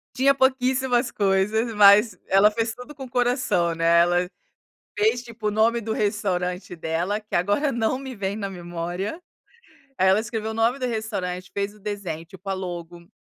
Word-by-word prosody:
Tinha 275 Hz, +2 st, +4 dB
pouquíssimas 260 Hz, -2 st, +1 dB
coisas, 210 Hz, +4 st, +1 dB
mas 205 Hz, 0 st, +6 dB
ela 195 Hz, +2 st, +5 dB
fez 225 Hz, +1 st, -1 dB
tudo 250 Hz, +4 st, -11 dB
com 270 Hz, -, -8 dB
o 255 Hz, -, -12 dB
coração, 240 Hz, -9 st, +1 dB
né. 165 Hz, +1 st, +4 dB
Ela 175 Hz, +1 st, +2 dB, 0.7 s
fez 225 Hz, +4 st, +2 dB
tipo 230 Hz, -3 st, -5 dB
o -, -, +1 dB
nome 225 Hz, +3 st, +2 dB
do 220 Hz, 0 st, -3 dB
restaurante 185 Hz, -4 st, -2 dB
dela, 170 Hz, +6 st, -2 dB
que 210 Hz, -, -10 dB
agora 205 Hz, -, +1 dB
não 235 Hz, +2 st, 0 dB
me 265 Hz, -1 st, -7 dB
vem 200 Hz, -1 st, -3 dB
na 200 Hz, -2 st, -3 dB
memória. 175 Hz, -, -5 dB, 0.8 s
Aí, 190 Hz, -, +3 dB
ela 190 Hz, +3 st, +5 dB
escreveu 220 Hz, 0 st, -4 dB
o -, -, -5 dB
nome 230 Hz, +3 st, +1 dB
do 255 Hz, -, -1 dB
restaurante, 205 Hz, -6 st, -4 dB
fez 200 Hz, 0 st, -2 dB
o 210 Hz, -, -19 dB
desenho, 195 Hz, -6 st, -5 dB
tipo 190 Hz, +2 st, -10 dB
a -, -, 0 dB
logo. 175 Hz, -2 st, -7 dB
210 Hz, 175 wpm, -24 LUFS, 180-235 Hz, 0.8 s, mas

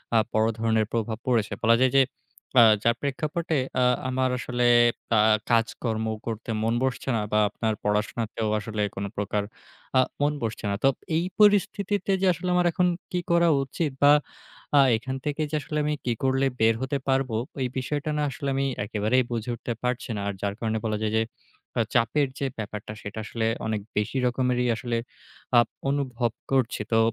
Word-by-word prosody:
আ -, -, +7 dB, 0.2 s
বড় 110 Hz, +1 st, +3 dB
ধরনের 110 Hz, -1 st, +2 dB
প্রভাব 110 Hz, -1 st, -1 dB
পড়েছে। 115 Hz, -4 st, +1 dB
বলা 115 Hz, 0 st, +5 dB
যায় 130 Hz, -1 st, +3 dB
যে 135 Hz, -, +7 dB, 0.6 s
আ -, -, +9 dB, 0.2 s
যার 115 Hz, 0 st, +3 dB
প্রেক্ষাপটে 155 Hz, +3 st, -1 dB, 0.3 s
আ -, -, +4 dB, 0.2 s
আমার 130 Hz, 0 st, +1 dB
আসলে 125 Hz, 0 st, -1 dB, 0.5 s
আ -, -, +5 dB, 0.3 s
কাজকর্ম 115 Hz, -1 st, 0 dB, 0.2 s
করতে 115 Hz, 0 st, -5 dB
মন 115 Hz, +1 st, +1 dB
বসছে 130 Hz, 0 st, -2 dB
না -, -, 0 dB
বা 105 Hz, -, +3 dB
আপনার 110 Hz, +1 st, -1 dB
পড়াশোনাতেও 105 Hz, +1 st, -1 dB
আসলে 110 Hz, 0 st, -4 dB
কোনপ্রকার 100 Hz, +1 st, -2 dB, 0.6 s
আ -, -, +7 dB, 0.2 s
মন 145 Hz, +1 st, +2 dB
বসছে 110 Hz, -1 st, -3 dB
না। -, -, 0 dB
তো 135 Hz, -, +6 dB, 0.3 s
এই 170 Hz, -, 0 dB
পরিস্থিতিতে 205 Hz, -1 st, +3 dB
যে 195 Hz, -, +3 dB
আসলে 180 Hz, +2 st, -4 dB
আমার 180 Hz, 0 st, +3 dB
এখন 180 Hz, +2 st, +2 dB, 0.2 s
কী 180 Hz, -, 0 dB
করা 170 Hz, 0 st, +4 dB
উচিত 145 Hz, +3 st, -2 dB
বা 145 Hz, +1 st, +8 dB, 0.6 s
আ 140 Hz, -, +8 dB, 0.2 s
এখান 130 Hz, +4 st, -5 dB
থেকে 150 Hz, +1 st, -2 dB
যে -, -, -1 dB
আসলে 150 Hz, -, -4 dB
আমি 150 Hz, -, +1 dB
কী 120 Hz, -, +1 dB
করলে 135 Hz, +1 st, +2 dB, 0.2 s
বের 110 Hz, 0 st, +5 dB
হতে 135 Hz, +2 st, -1 dB
পারবো 130 Hz, -3 st, +1 dB, 0.2 s
ওই 130 Hz, -, 0 dB
বিষয়টা 145 Hz, +3 st, -2 dB
না 150 Hz, -, +1 dB
আসলে 140 Hz, +2 st, -4 dB
আমি 135 Hz, 0 st, +1 dB, 0.2 s
একেবারেই 110 Hz, +5 st, +1 dB
বুঝে 115 Hz, 0 st, -3 dB
উঠতে 120 Hz, +1 st, -4 dB
পারছি 125 Hz, 0 st, -2 dB
না। -, -, -3 dB
আর 100 Hz, -, -1 dB
যার 100 Hz, -1 st, -1 dB
কারণে 110 Hz, -1 st, -1 dB
বলা 110 Hz, -1 st, 0 dB
যায় 110 Hz, 0 st, -1 dB
যে -, -, +3 dB, 0.6 s
আ -, -, +5 dB
চাপের 135 Hz, +5 st, +2 dB
যে 140 Hz, -, -1 dB
ব্যাপারটা 105 Hz, -1 st, -6 dB
সেটা 105 Hz, +2 st, -6 dB
আসলে 110 Hz, 0 st, -2 dB, 0.2 s
অনেক 110 Hz, -2 st, -1 dB, 0.2 s
বেশি 105 Hz, +5 st, 0 dB
রকমেরই 125 Hz, 0 st, +1 dB
আসলে 120 Hz, +1 st, -2 dB, 0.6 s
আ -, -, +10 dB, 0.3 s
অনুভব 130 Hz, -4 st, -1 dB, 0.2 s
করছি। 130 Hz, -5 st, +1 dB
তো 115 Hz, -, +4 dB
120 Hz, 180 wpm, -26 LUFS, 110-140 Hz, 0.6 s, আ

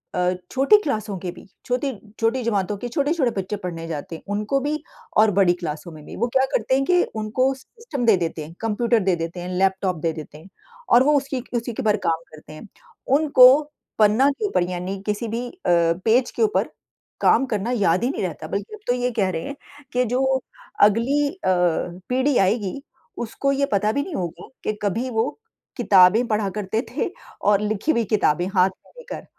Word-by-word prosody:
अ, 180 Hz, 0 st, +1 dB, 0.2 s
छोटी 275 Hz, +11 st, +5 dB
क्लासों 215 Hz, -7 st, -2 dB
के 180 Hz, -, -5 dB
भी -, -, -14 dB, 0.2 s
छोटी 250 Hz, +3 st, -1 dB, 0.3 s
छोटी 230 Hz, +3 st, +1 dB
जमातों 205 Hz, -3 st, 0 dB
के 245 Hz, -, -5 dB
छोटे-छोटे 280 Hz, +1 st, 0 dB
बच्चे 190 Hz, +3 st, -4 dB
पढ़ने 165 Hz, -2 st, -5 dB
जाते 160 Hz, +1 st, -5 dB
हैं, -, -, -10 dB
उनको 210 Hz, +6 st, 0 dB
भी 300 Hz, +2 st, -2 dB, 0.3 s
और 215 Hz, 0 st, +6 dB
बड़ी 180 Hz, -3 st, +5 dB
क्लासों 155 Hz, +1 st, -5 dB
में 155 Hz, -1 st, -12 dB
भी, -, -, -9 dB
वो 235 Hz, -, 0 dB
क्या 265 Hz, -, +4 dB
करते 245 Hz, +3 st, +1 dB
हैं 275 Hz, -, +2 dB
कि 360 Hz, -1 st, +4 dB, 0.2 s
उनको 255 Hz, +5 st, +1 dB
सिस्टम 280 Hz, -, -6 dB
दे 225 Hz, -3 st, +6 dB
देते 165 Hz, -2 st, -3 dB
हैं, 165 Hz, -, -12 dB
कंप्यूटर 225 Hz, +1 st, +1 dB
दे 185 Hz, -1 st, +2 dB
देते 165 Hz, +1 st, -5 dB
हैं, 180 Hz, +1 st, -5 dB
लैपटॉप 190 Hz, -1 st, +1 dB
दे 165 Hz, 0 st, +1 dB
देते 155 Hz, -1 st, -9 dB
हैं 175 Hz, +5 st, -15 dB, 0.4 s
और 240 Hz, +2 st, +7 dB
वो 295 Hz, +2 st, +3 dB
उसकी 270 Hz, -2 st, -3 dB
उसी 235 Hz, 0 st, -4 dB
के -, -, -4 dB
ऊपर 215 Hz, -1 st, +2 dB
काम 165 Hz, 0 st, 0 dB
करते 155 Hz, 0 st, -13 dB
हैं। 155 Hz, +8 st, -11 dB, 0.5 s
उनको 285 Hz, -5 st, +7 dB, 0.5 s
पन्ना 220 Hz, +6 st, +5 dB
के 420 Hz, +10 st, -3 dB
ऊपर 285 Hz, -, +1 dB
यानी 180 Hz, +2 st, -4 dB
किसी 210 Hz, +2 st, -2 dB
भी 235 Hz, +3 st, -3 dB
अ, -, -, -15 dB
पेज 175 Hz, +9 st, +2 dB
के -, -, -5 dB
ऊपर 435 Hz, +1 st, +1 dB, 0.5 s
काम 270 Hz, -, +4 dB
करना 225 Hz, 0 st, -2 dB
याद 195 Hz, -4 st, +2 dB
ही 245 Hz, -, +2 dB
नहीं 310 Hz, -, -3 dB
रहता। -, -, -4 dB
बल्कि 435 Hz, -, -4 dB
अब -, -, -16 dB
तो 245 Hz, -, +3 dB
ये 250 Hz, 0 st, -1 dB
कह 190 Hz, -2 st, +2 dB
रहे 165 Hz, -3 st, -3 dB
हैं, 280 Hz, -, -6 dB, 0.4 s
कि 250 Hz, 0 st, +2 dB
जो 250 Hz, +3 st, 0 dB, 0.6 s
अगली 240 Hz, +8 st, +3 dB
अ, 380 Hz, -, -20 dB, 0.7 s
पीढ़ी 260 Hz, +2 st, +2 dB
आएगी, 200 Hz, +5 st, +1 dB, 0.4 s
उसको 240 Hz, +4 st, -1 dB
ये 280 Hz, 0 st, +1 dB
पता 210 Hz, +1 st, +2 dB
भी 280 Hz, -, 0 dB
नहीं 355 Hz, -2 st, -6 dB
होगा 175 Hz, -1 st, -5 dB, 0.2 s
कि 215 Hz, -, -1 dB
कभी 230 Hz, +6 st, -1 dB
वो 225 Hz, -1 st, 0 dB, 0.5 s
किताबें 195 Hz, +5 st, +5 dB
पढ़ा 210 Hz, -3 st, 0 dB
करते 220 Hz, +5 st, -2 dB
थे -, -, -1 dB, 0.4 s
और 205 Hz, 0 st, +3 dB
लिखी 215 Hz, +8 st, 0 dB
हुई 235 Hz, -6 st, +1 dB
किताबें 175 Hz, -2 st, +1 dB
हाथ 185 Hz, 0 st, +5 dB, 0.2 s
में -, -, -22 dB
लेकर 485 Hz, 0 st, -8 dB
220 Hz, 200 wpm, -22 LUFS, 185-260 Hz, 0.7 s, और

